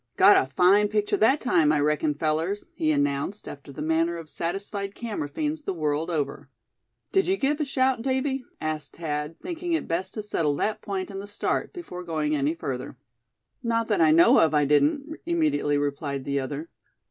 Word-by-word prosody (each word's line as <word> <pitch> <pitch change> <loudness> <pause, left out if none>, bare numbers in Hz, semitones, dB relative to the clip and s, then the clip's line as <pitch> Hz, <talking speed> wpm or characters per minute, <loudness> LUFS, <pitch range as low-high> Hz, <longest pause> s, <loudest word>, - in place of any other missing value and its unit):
"Got - - +8
a 130 - +2
fine 190 +7 +5
picture 210 0 0
that 265 +8 +4
time, 165 -12 +3
I 150 - +2
reckon, 150 0 +1
fellers," 160 +6 -1
he 155 -1 +1
announced, 145 +7 -1
after 140 0 -9
the 135 - -6
manner 165 +2 +1
of 165 -2 -9
satisfied 200 +3 -4
camera 210 -11 -4
fiends 300 - -3
the 195 - -3
world 155 +1 -1
over. 145 -4 -3 0.6
"Did 385 -1 +2
you 380 +1 +2
give 295 0 +1
a 300 - 0
shout, 260 -3 +1
Davy?" 265 +1 -1 0.2
asked 155 -1 -3
Thad, 150 -1 -3
thinking 350 0 -3
it 325 - -1
best 170 +3 -2
to 215 - -4
settle 160 -8 0
that 215 +8 -1
point 195 0 -4
in 195 - -5
the 200 - -7
start, 205 - -2
before 335 - -8
going 155 -3 -1
any 145 +3 0
further. 130 -4 -5 0.6
"Not 230 -1 0
that 205 -5 +2
I 160 - +6
know 165 +2 +6
of, 155 -1 +3
I 145 -1 +4
didn't," 150 - +3 0.2
immediately 305 - +1
replied 140 -1 -2
the 140 0 0
other. 145 +5 -5
170 Hz, 190 wpm, -26 LUFS, 150-225 Hz, 0.6 s, Got